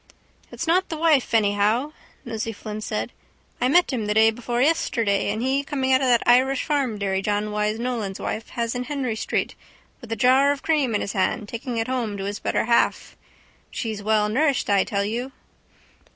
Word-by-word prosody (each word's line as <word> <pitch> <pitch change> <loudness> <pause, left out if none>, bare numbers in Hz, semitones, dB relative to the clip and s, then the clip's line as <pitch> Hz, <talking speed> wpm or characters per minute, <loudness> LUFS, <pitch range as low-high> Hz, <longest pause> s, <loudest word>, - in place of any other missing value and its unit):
—It's - - -5
not 360 +3 +2
the 320 - -4
wife 310 -5 +2
anyhow, 215 +6 +2 0.3
Nosey 225 -1 -3
Flynn 215 0 -7
said. - - -3 0.5
I 250 - +3
met 345 +2 +3
him 225 -4 -2
the 210 - 0
day 220 0 +6
before 240 +1 -3
yesterday 230 -9 +1
and 215 +3 -2
he 270 +2 +1
coming 265 -2 0
out 260 - +4
of 265 - +1
that 240 -2 +3
Irish 255 +2 +4
farm 275 -8 -1
dairy 195 -1 -1
John 210 +1 -1
Wyse 210 +1 -1
Nolan's 230 -5 -3
wife 220 - -4
has 235 -1 -1
in 250 0 -3
Henry 270 -6 -2
street 220 - -2 0.5
with 240 -3 -11
a - - 0
jar 260 +5 +4
of 285 - -4
cream 290 -8 +1
in - - 0
his 200 - -4
hand 205 +3 0
taking 235 +2 -5
it 225 - -1
home 240 -5 -2
to 195 - -5
his 200 +1 -4
better - - -1
half. 235 0 +1 0.5
She's 220 -4 -4
well 215 0 +2
nourished, 270 +2 +1
I 200 -1 +4
tell 200 -1 -1
you. 240 +5 -4
235 Hz, 195 wpm, -23 LUFS, 210-265 Hz, 0.5 s, day